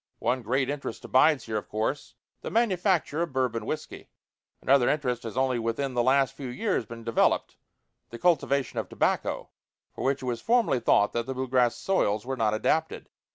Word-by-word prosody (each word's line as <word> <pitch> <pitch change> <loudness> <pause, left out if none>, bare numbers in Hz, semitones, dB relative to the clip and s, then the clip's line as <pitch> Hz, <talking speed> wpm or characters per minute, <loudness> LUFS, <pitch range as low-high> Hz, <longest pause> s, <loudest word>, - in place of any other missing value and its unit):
One 130 0 0
great 130 +4 0
interest 140 -4 -5
abides 135 +1 +4
here, 110 -1 -2
of 105 - -6
course 110 +7 -3 0.3
the - - -5
manufacture 185 -8 +1
of 170 -3 -2
Bourbon 120 -4 -1
whiskey. 155 - -6 0.5
Another 135 -2 +3
interest 125 -5 -1
has 115 +1 -7
only 130 -2 +1
within 115 +4 -2
the 120 - +1
last 135 +2 +2
few 135 - -6
years 125 - -2
been 115 0 -9
developed 115 0 +1 0.5
the 115 - -8
cultivation 140 -4 +1
of - - -5
tobacco, - - -1 0.4
for - - -6
which 135 0 0
it - - -4
was 120 -2 -2
formerly 230 - +2
thought 105 -3 +3
that 120 0 -2
the 130 - -4
blue 130 +1 -3
grass 125 -2 +2
soils 110 - 0
were 135 +1 -2
not 110 -3 +1
adapted. 160 +8 -1
130 Hz, 185 wpm, -27 LUFS, 115-145 Hz, 0.5 s, abides